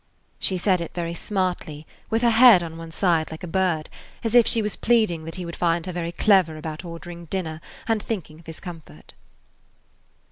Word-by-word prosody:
She 190 - +1
said 185 -1 +2
it 170 - -6
very 170 -1 -2
smartly, 175 -5 -3 0.2
with 225 +2 0
her 235 - +5
head 225 -5 +8
on 165 -1 -7
one 165 0 -9
side 165 -2 +1
like 160 +2 -9
a - - -4
bird, 170 -3 0 0.4
as 225 -1 -1
if 240 -2 +6
she 225 - +2
was 210 - -1
pleading 215 -9 +2
that 165 - -6
he 185 -1 -5
would 170 - -6
find 170 -1 +1
her 185 - -4
very 170 -1 -3
clever 180 -4 +3
about 155 +1 -6
ordering 170 0 -8
dinner 160 -3 -4 0.3
and 225 -2 +1
thinking 165 -9 -5
of 165 - -19
his 160 - -8
comfort. 160 - -11
175 Hz, 200 wpm, -24 LUFS, 165-195 Hz, 0.4 s, head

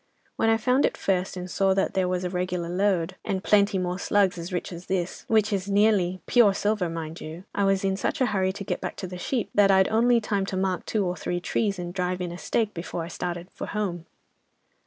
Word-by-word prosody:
When 225 - +2
I 225 - +4
found 250 +4 +2
it - - +1
first 185 -1 -1
and 180 0 -5
saw 190 +1 +2
that 195 - +1
there 190 -1 +1
was 180 0 -1
a 180 - -1
regular 180 -1 -2
lode, 185 -1 0
and 190 -1 -2
plenty 200 -1 +3
more 180 0 -2
"slugs" 200 -2 +2
as 170 +3 -6
rich 180 0 -3
as 170 +1 -9
this, 185 -2 -2
which 215 -1 +2
is 195 0 -2
nearly 200 -3 +3
pure 220 -5 +5
silver, 205 -3 0
mind 165 -1 -6
you, 160 +3 -8
I 200 - +1
was 195 0 +2
in 195 0 +1
such 290 +9 -2
a 260 - +4
hurry 190 -4 +1
to 200 - -6
get - - -3
back - - -4
to - - -5
the 180 0 -7
sheep, 240 +5 -2
that 205 -1 +5
I'd 190 -1 +5
only 235 +2 +4
time 205 -3 -1
to 190 - -3
mark 185 -1 -1
two 210 -3 0
or 180 0 -1
three 175 0 -3
trees, 200 +2 -1
and 175 -1 -5
drive 180 -1 -1
in 180 -1 -3
a 175 - -7
stake, 220 -3 0
before 170 0 -4
I 165 - -7
started 175 0 -4
for - - -6
home. 185 -5 -3
190 Hz, 240 wpm, -26 LUFS, 180-205 Hz, -, pure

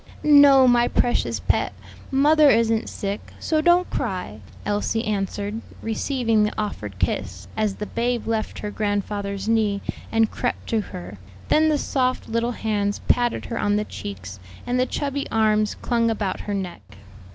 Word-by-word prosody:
"No, 285 -3 +7
my 240 -1 +4
precious 245 - +1
pet, - - 0 0.4
mother 295 +2 +5
isn't 225 -2 +2
sick; 200 +1 -5
so 310 -1 +1
don't 350 +2 +4
cry," 180 - -3 0.3
Elsie 210 +2 -1
answered, 205 +1 -2 0.2
receiving 225 -1 +1
the 210 - 0
offered 105 - -4
kiss, - - -2
as 215 -2 0
the 210 - -5
babe 240 +2 -1
left 225 -1 -2
her 210 - -5
grandfather's 205 -1 -2
knee 215 -3 +2 0.3
and 225 -1 +2
crept - - -3
to 225 -2 +1
her; 95 - -9 0.3
then 315 +1 +4
the 305 - +2
soft 255 -2 -1
little 230 +2 -1
hands 205 -2 -1
patted 240 -1 +1
her 230 - -4
on 205 0 +1
the 210 0 0
cheeks 95 - -8 0.3
and 250 +1 0
the 255 - +2
chubby 280 +1 -3
arms 215 -1 +2
clung 235 -1 0
about 210 -4 -2
her 205 - -3
neck. 180 - -5
220 Hz, 155 wpm, -23 LUFS, 205-245 Hz, 0.4 s, No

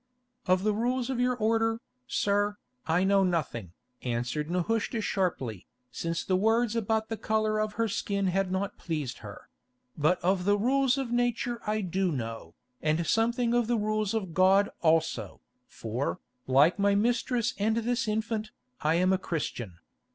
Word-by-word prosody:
"Of 185 +1 +3
the 215 0 +2
rules 245 +3 0
of 250 - -2
your 250 0 +2
order, 225 0 +1 0.3
sir, 205 0 +1 0.3
I 165 +3 +2
know 195 0 +4
nothing," 135 - -2 0.3
answered 125 +5 -2
Nehushta 210 +6 0
sharply, 135 - -2 0.2
since 165 0 -3
the 185 - +1
words 225 +3 +2
about 220 0 0
the 225 - -3
colour 215 0 0
of 215 0 -1
her 230 +1 0
skin 200 -1 -1
had 190 0 0
not 195 +2 -2
pleased 150 -7 -3
her; 100 -3 -10 0.5
"but 155 +4 +2
of 185 0 +2
the 205 +1 +4
rules 265 +4 +2
of 265 -3 -3
nature 240 0 0
I 215 0 0
do 185 0 0
know, 115 - -5 0.3
and 155 +2 +1
something 235 +4 +1
of 240 -2 +2
the 240 0 +1
rules 215 0 0
of 190 -7 -3
God 190 +3 +4
also, 160 - +1 0.3
for, 85 - -3 0.3
like 140 +9 +4
my 200 0 +3
mistress 235 +2 +1
and 220 +2 +1
this 235 +1 0
infant, 215 0 -1 0.3
I 155 +2 +2
am 185 +2 +3
a 190 - +1
Christian. 120 - -4
200 Hz, 160 wpm, -28 LUFS, 165-225 Hz, 0.5 s, know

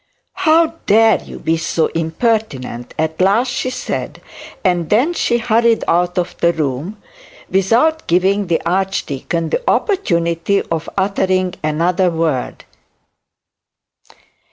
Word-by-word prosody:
'How 325 +1 +2
dare 220 0 +4
you - - -10
be 165 +1 0
so 160 0 0
impertinent?' 160 - -2
at 160 +2 -1
last 210 +7 +3
she 255 - -2
said; 255 - -4 0.5
and 175 -3 +1
then 255 +11 +2
hurried 235 -4 +1
out 175 +1 +1
of 180 0 -1
the 170 - +3
room, 155 +6 -3 0.5
without 230 - +2
giving 190 +3 +2
the 170 -1 +1
archdeacon 170 -3 -2
the - - 0
opportunity 170 - +1
of 165 -1 -4
uttering 185 -2 0
another 175 +4 +1
word. 160 -6 -2
185 Hz, 110 wpm, -17 LUFS, 165-225 Hz, 0.5 s, dare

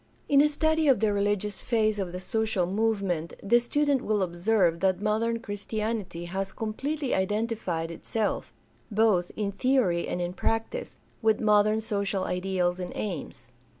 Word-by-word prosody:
In 280 0 +6
a 300 - +4
study 315 +1 +1
of 270 -4 +5
the 215 -2 +2
religious 205 0 -1
phase 215 -3 +1
of 185 -3 -2
the 180 - -5
social 220 -1 0
movement 195 -4 -1
the 235 +4 +5
student 285 +2 +1
will 210 -4 +1
observe 175 -1 +1
that 185 -1 +2
modern 220 +2 +1
Christianity 210 -4 -4
has 190 +2 -3
com 220 -1 -4
pletely 285 +2 -2
identified 190 -4 -1
itself, 210 +5 -2 0.4
both 210 -5 +2
in 205 -2 -1
theory 200 -6 +1
and - - -2
in 175 0 -2
practice, 225 - -2 0.2
with 220 -2 +3
modern 215 0 +3
social 200 -3 -1
ideals 180 -1 -1
and 180 - -4
aims. 145 - -5
210 Hz, 150 wpm, -27 LUFS, 185-225 Hz, 0.4 s, In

